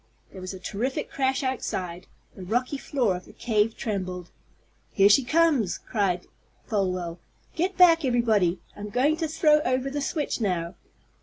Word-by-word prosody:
There 190 Hz, -, -10 dB
was 185 Hz, -, -5 dB
a -, -, -9 dB
terrific 220 Hz, +8 st, -3 dB
crash 265 Hz, 0 st, 0 dB
outside. 185 Hz, -9 st, -3 dB, 0.3 s
The -, -, -10 dB
rocky 245 Hz, +9 st, -1 dB
floor 245 Hz, -11 st, 0 dB
of 180 Hz, -, -8 dB
the -, -, -15 dB
cave 220 Hz, -1 st, 0 dB
trembled. 185 Hz, -4 st, -4 dB, 0.6 s
"Here 200 Hz, 0 st, +5 dB
she 235 Hz, +6 st, +5 dB
comes!" 290 Hz, -, +2 dB
cried 190 Hz, -4 st, -1 dB, 0.4 s
Folwell. 185 Hz, -5 st, -2 dB, 0.4 s
"Get 360 Hz, +3 st, -1 dB
back, 335 Hz, -3 st, +6 dB
everybody! 220 Hz, -8 st, +2 dB, 0.2 s
I'm 205 Hz, 0 st, -7 dB
going 260 Hz, +8 st, +2 dB
to 325 Hz, -1 st, -1 dB
throw 305 Hz, -1 st, +4 dB
over 255 Hz, -1 st, -1 dB
the 290 Hz, +1 st, -2 dB
switch 290 Hz, -3 st, -2 dB
now!" 180 Hz, -4 st, -1 dB
225 Hz, 155 wpm, -26 LUFS, 185-275 Hz, 0.6 s, back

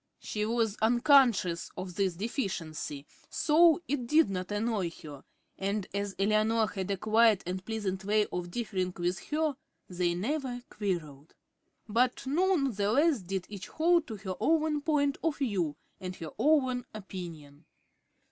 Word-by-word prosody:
She 210 Hz, 0 st, -3 dB
was 225 Hz, -2 st, 0 dB
unconscious 235 Hz, -, +4 dB
of 185 Hz, -1 st, -5 dB
this 190 Hz, -2 st, 0 dB
deficiency, 165 Hz, -, -4 dB, 0.2 s
so 330 Hz, +2 st, +4 dB
it 260 Hz, -4 st, -2 dB
did 305 Hz, -4 st, +4 dB
not 185 Hz, +1 st, -4 dB
annoy 205 Hz, -3 st, 0 dB
her, 145 Hz, -3 st, -9 dB, 0.4 s
and 200 Hz, 0 st, -1 dB
as 200 Hz, -1 st, -2 dB
Eleanor 215 Hz, +2 st, +2 dB
had 195 Hz, -2 st, -4 dB
a 200 Hz, -, 0 dB
quiet 220 Hz, 0 st, +4 dB
and 185 Hz, +1 st, -4 dB
pleasant 195 Hz, -3 st, -3 dB
way 210 Hz, +1 st, +2 dB
of 180 Hz, 0 st, -4 dB
differing 185 Hz, -4 st, -2 dB
with 175 Hz, +1 st, -1 dB
her, 305 Hz, -1 st, 0 dB, 0.3 s
they 175 Hz, -1 st, 0 dB
never 245 Hz, -, -2 dB
quarrelled. 160 Hz, -8 st, -4 dB, 0.5 s
But 245 Hz, +5 st, +1 dB
none 310 Hz, -1 st, +2 dB
the 200 Hz, 0 st, 0 dB
less 290 Hz, 0 st, +3 dB
did 190 Hz, 0 st, -4 dB
each 200 Hz, -2 st, -8 dB
hold 335 Hz, +1 st, +2 dB
to 225 Hz, -, -5 dB
her 195 Hz, -1 st, -5 dB
own 315 Hz, -2 st, +2 dB
point 285 Hz, -2 st, +1 dB
of 325 Hz, -3 st, 0 dB
view 190 Hz, -, -1 dB, 0.2 s
and 185 Hz, 0 st, -6 dB
her 165 Hz, -3 st, -7 dB
own 260 Hz, -2 st, +2 dB
opinion. 165 Hz, -7 st, -9 dB
210 Hz, 145 wpm, -30 LUFS, 185-265 Hz, 0.5 s, unconscious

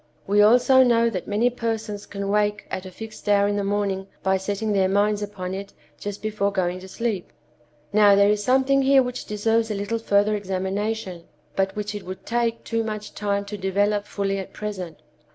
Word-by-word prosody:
(We 205 Hz, +1 st, +4 dB
also 250 Hz, +5 st, +6 dB
know 235 Hz, -2 st, +4 dB
that 185 Hz, -5 st, -4 dB
many 225 Hz, +4 st, +2 dB
persons 225 Hz, -3 st, -3 dB
can 200 Hz, -1 st, -5 dB
wake 210 Hz, 0 st, +1 dB
at 190 Hz, 0 st, -4 dB
a -, -, -10 dB
fixed 215 Hz, +2 st, -8 dB
hour 200 Hz, 0 st, +4 dB
in 205 Hz, -, 0 dB
the 205 Hz, -, -1 dB
morning 195 Hz, -1 st, -1 dB, 0.2 s
by 190 Hz, 0 st, +2 dB
setting 205 Hz, +3 st, -2 dB
their 190 Hz, -1 st, +3 dB
minds 205 Hz, +1 st, +2 dB
upon 190 Hz, -3 st, -5 dB
it 195 Hz, +1 st, -6 dB, 0.3 s
just 205 Hz, 0 st, -6 dB
before 210 Hz, -2 st, 0 dB
going 185 Hz, -2 st, -1 dB
to 190 Hz, -, -11 dB
sleep.) 210 Hz, -2 st, -3 dB, 0.6 s
Now, 205 Hz, -1 st, +6 dB
there 200 Hz, +1 st, +5 dB
is 210 Hz, 0 st, 0 dB
something 265 Hz, +2 st, +3 dB
here 270 Hz, 0 st, +5 dB
which 250 Hz, 0 st, -5 dB
deserves 225 Hz, +2 st, +1 dB
a 210 Hz, -, -2 dB
little 205 Hz, +3 st, -2 dB
further 205 Hz, -1 st, +2 dB
examination, 195 Hz, -1 st, -3 dB, 0.3 s
but 195 Hz, 0 st, 0 dB
which 210 Hz, 0 st, -3 dB
it 205 Hz, -, -5 dB
would 185 Hz, +1 st, -8 dB
take 230 Hz, -1 st, -1 dB
too 230 Hz, -1 st, -1 dB
much 215 Hz, -1 st, -5 dB
time 200 Hz, -1 st, -1 dB
to 205 Hz, +1 st, -6 dB
develop 205 Hz, +2 st, +1 dB
fully 195 Hz, -1 st, -2 dB
at 190 Hz, -, -8 dB
present. 185 Hz, -6 st, -5 dB
205 Hz, 195 wpm, -24 LUFS, 195-220 Hz, 0.6 s, also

